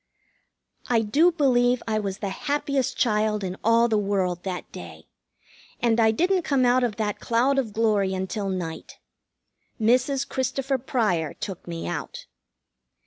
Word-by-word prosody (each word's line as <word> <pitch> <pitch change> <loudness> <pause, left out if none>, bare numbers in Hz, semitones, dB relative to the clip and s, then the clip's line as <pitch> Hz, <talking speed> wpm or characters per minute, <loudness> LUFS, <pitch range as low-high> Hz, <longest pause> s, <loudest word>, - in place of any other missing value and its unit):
I 235 -2 +3
do 295 +12 +3
believe 250 -6 +2
I 215 -1 0
was 200 -2 -3
the 205 -2 -3
happiest 280 +4 -1
child 210 -2 +1
in 185 -1 -3
all 230 +1 +4
the 220 -2 +1
world 190 -3 -1
that 180 -3 -5
day, 80 -2 -10 0.7
and 235 -1 +2
I 220 -1 +5
didn't 360 - +2
come 275 -5 +1
out 250 +1 +3
of 235 -4 -1
that 210 -1 -2
cloud 255 +4 +2
of 235 -5 -2
glory 205 -3 +1
until 195 +2 -3
night. 175 -4 -5 0.8
Mrs. 255 +5 +2
Christopher 265 +1 -1
Pryor 210 - -1
took 190 -3 -7
me 170 - -5
out. - - -5
220 Hz, 145 wpm, -25 LUFS, 195-255 Hz, 0.8 s, I